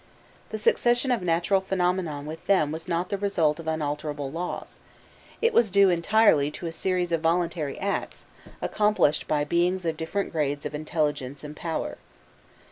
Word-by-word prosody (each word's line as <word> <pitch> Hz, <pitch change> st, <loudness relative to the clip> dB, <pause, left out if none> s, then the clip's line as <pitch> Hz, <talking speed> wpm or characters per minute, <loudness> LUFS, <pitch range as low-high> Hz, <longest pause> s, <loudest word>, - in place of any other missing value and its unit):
The 220 Hz, -, -4 dB
succession 240 Hz, +4 st, +2 dB
of 240 Hz, -, +1 dB
natural 175 Hz, +3 st, +2 dB
phenomena 180 Hz, -5 st, -1 dB
with 155 Hz, +2 st, -8 dB
them 155 Hz, -7 st, +3 dB
was 160 Hz, +1 st, -6 dB
not 170 Hz, +2 st, -1 dB
the 200 Hz, -, -2 dB
result 170 Hz, -7 st, +1 dB
of 165 Hz, -, -8 dB
unalterable 150 Hz, -2 st, -2 dB
laws; 170 Hz, +3 st, -5 dB, 0.6 s
it 465 Hz, 0 st, +3 dB
was 230 Hz, -3 st, +4 dB
due 195 Hz, 0 st, +5 dB
entirely 170 Hz, -4 st, +4 dB
to 160 Hz, -, -8 dB
a 165 Hz, -, -2 dB
series 180 Hz, +1 st, -1 dB
of 165 Hz, -1 st, +1 dB
voluntary 165 Hz, -3 st, 0 dB
acts, 200 Hz, +1 st, -3 dB, 0.4 s
accomplished 210 Hz, -8 st, +2 dB
by 150 Hz, -1 st, +1 dB
beings 175 Hz, +4 st, +1 dB
of 160 Hz, -1 st, -1 dB
different 180 Hz, +5 st, -2 dB
grades 145 Hz, -3 st, -1 dB
of -, -, -4 dB
intelligence 150 Hz, -3 st, -2 dB
and 150 Hz, 0 st, -8 dB
power. 165 Hz, 0 st, -4 dB
170 Hz, 160 wpm, -26 LUFS, 150-190 Hz, 0.6 s, due